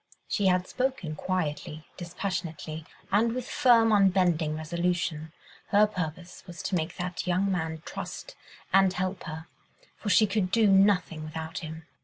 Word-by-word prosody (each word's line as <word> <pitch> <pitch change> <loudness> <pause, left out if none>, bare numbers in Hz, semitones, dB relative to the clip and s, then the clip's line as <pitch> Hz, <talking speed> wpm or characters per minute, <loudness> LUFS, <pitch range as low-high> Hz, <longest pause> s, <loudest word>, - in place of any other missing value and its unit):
She 205 -3 +1
had 180 0 +2
spoken 250 -12 -2
quietly, 155 -3 -3
dispassionately, 170 -3 -5 0.2
and 225 +3 +3
with 255 0 -4
firm, 235 -5 +4
unbending 180 -6 +3
resolution. 165 -1 -2 0.4
Her 210 +1 +5
purpose 180 -3 -5
was 175 -2 -8
to 190 - -1
make 165 +1 -2
that 180 -1 -4
young 185 +2 +1
man 160 -3 -2
trust - - -7 0.4
and 195 -1 +6
help 185 +1 -3
her, 160 -1 -6 0.5
for 210 - -4
she 215 - +6
could 195 -2 0
do 225 +3 +3
nothing 195 -5 +3
without 160 +2 -5
him. 160 -1 -8
180 Hz, 145 wpm, -28 LUFS, 160-195 Hz, 0.5 s, and